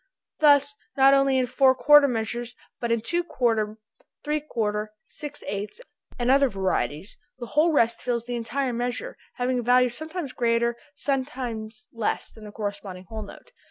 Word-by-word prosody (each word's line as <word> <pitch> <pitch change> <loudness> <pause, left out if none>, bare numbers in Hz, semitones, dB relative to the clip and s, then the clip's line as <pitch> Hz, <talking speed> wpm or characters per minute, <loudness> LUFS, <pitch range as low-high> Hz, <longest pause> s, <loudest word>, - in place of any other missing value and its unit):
Thus, 285 -1 +5 0.2
not 270 0 +7
only 275 -1 +4
in 255 - +2
four 260 +2 +4
quarter 295 +1 +7
measure, 235 -1 -2 0.4
but 235 -1 -2
in 230 -1 +1
two 345 +9 -1
quarter, 225 -8 0 0.5
three 300 0 0
quarter, 215 -7 -2
six 295 -1 -8
eighth, 205 - -5 0.4
and 245 +1 +2
other 275 0 +5
varieties, 190 - -2 0.2
the 245 - -6
whole 305 +8 +2
rest 230 -6 +2
fills 235 -2 -2
the 245 0 -4
entire 245 +3 -2
measure, 245 - -3 0.2
having 250 0 0
a - - -1
value 250 +1 +4
sometimes 315 +2 -5
greater, 235 0 +1 0.2
sometimes 250 -6 -3
less 230 -2 -2
than 220 -1 -13
the 210 - -9
corresponding 200 -3 -5
whole 220 -1 -5
note. 205 - -12
245 Hz, 160 wpm, -25 LUFS, 220-275 Hz, 0.5 s, not